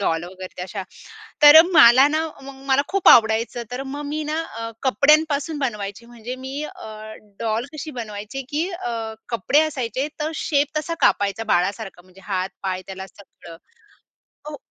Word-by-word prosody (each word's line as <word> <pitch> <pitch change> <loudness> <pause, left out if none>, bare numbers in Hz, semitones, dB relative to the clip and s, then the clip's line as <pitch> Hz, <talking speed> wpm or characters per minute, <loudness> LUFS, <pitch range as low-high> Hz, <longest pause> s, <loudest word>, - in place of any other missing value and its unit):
Doll 165 -3 0
वगैरे 185 +1 -10
ते 180 - -5
अशा. 190 +2 -6 0.6
तर 295 +1 +10
अ, - - +12
मला 265 -3 +8
ना 310 +1 0 0.2
मग 275 0 -10
मला 270 +1 +3
खूप 395 -1 +2
आवडायचं 225 +1 +4
तर 250 +2 -4
मग 285 +2 -6
मी 305 +2 -3
ना 310 +2 -2 0.2
अ, 230 0 -5
कपड्यांपासून 295 +4 +2
बनवायचे. 210 -4 -4
म्हणजे 240 +1 -8
मी 265 +3 -6
अ, 260 - -10 0.5
डॉल 225 +1 -1
कशी 305 0 -7
बनवायची 215 +4 -7
की 310 +4 -1
अ, 230 -10 -5
कपडे 245 +6 +2
असायचे, 265 -1 -3
तर 305 - -1
शेप 290 0 -1
तसा 335 +2 -3
कापायचा 205 +2 +1
बाळासारखा 195 +1 -2
म्हणजे 185 +1 -19
हात, 185 -2 -2
पाय 185 -1 -3
त्याला 190 0 -7
सगळं. 180 -4 -15 0.9
हो. 300 - -6
240 Hz, 165 wpm, -22 LUFS, 205-290 Hz, 0.9 s, अ